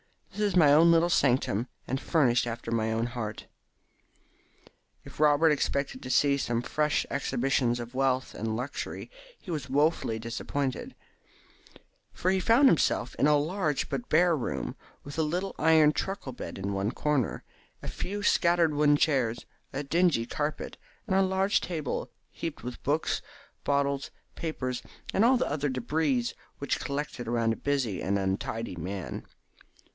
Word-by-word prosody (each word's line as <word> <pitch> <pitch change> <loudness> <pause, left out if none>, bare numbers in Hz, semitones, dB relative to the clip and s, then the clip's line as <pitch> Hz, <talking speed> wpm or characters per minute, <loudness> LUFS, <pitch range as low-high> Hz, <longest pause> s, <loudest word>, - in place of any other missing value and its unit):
This 210 - -6
is - - -3
my 150 -5 +6
own 165 +3 +7
little 170 +1 +4
sanctum, 125 - +2 0.2
and 135 +2 -2
furnished 125 -7 +2
after 115 0 -5
my 110 -1 0
own 115 +1 0
heart." 115 -3 -5 1.6
If - - -13
Robert 150 +1 +5
expected 140 -2 -1
to 130 - -7
see 140 +2 +3
some 120 -3 -1
fresh 150 +2 0
exhibition 130 -2 0
of 120 +1 -7
wealth 130 0 0
and 110 0 -3
luxury 125 +5 -5 0.3
he 180 - -8
was 145 -5 -4
woefully 145 -4 +1
disappointed, 125 +3 -3 1.2
for 185 - 0
he 190 - +2
found 230 +8 +5
himself 145 - +2
in 145 - +4
a 150 -1 +5
large 155 -1 -1
but 245 - -4
bare 170 +1 +4
room, 130 - -3 0.3
with 145 +3 -7
a - - +4
little 180 +5 -1
iron 160 -1 +5
truckle 190 -4 -4
bed 125 - -7
in 100 +1 -3
one 100 +1 0
corner, 145 -3 -1 0.4
a - - -6
few 205 +2 -4
scattered 170 -5 +3
wooden 145 0 +4
chairs, 130 -7 +1 0.3
a 140 +2 -3
dingy 165 -5 +2
carpet, 150 +5 -3 0.3
and 190 -4 0
a 195 - +5
large 190 +2 +2
table 155 -6 -3 0.2
heaped 165 -3 -6
with 125 0 -6
books, 150 +3 0 0.4
bottles, 140 -1 0 0.2
papers, 130 -6 -3 0.3
and 200 - +3
all 255 +3 +5
the 245 - 0
other 145 0 -1
debris 130 0 0 0.3
which 140 - -1
collect 145 0 -4
around 115 -1 0
a - - -7
busy 135 -9 -1
and 100 +2 0
untidy 95 +2 -2
man. 95 +3 -5
140 Hz, 155 wpm, -28 LUFS, 120-160 Hz, 1.6 s, own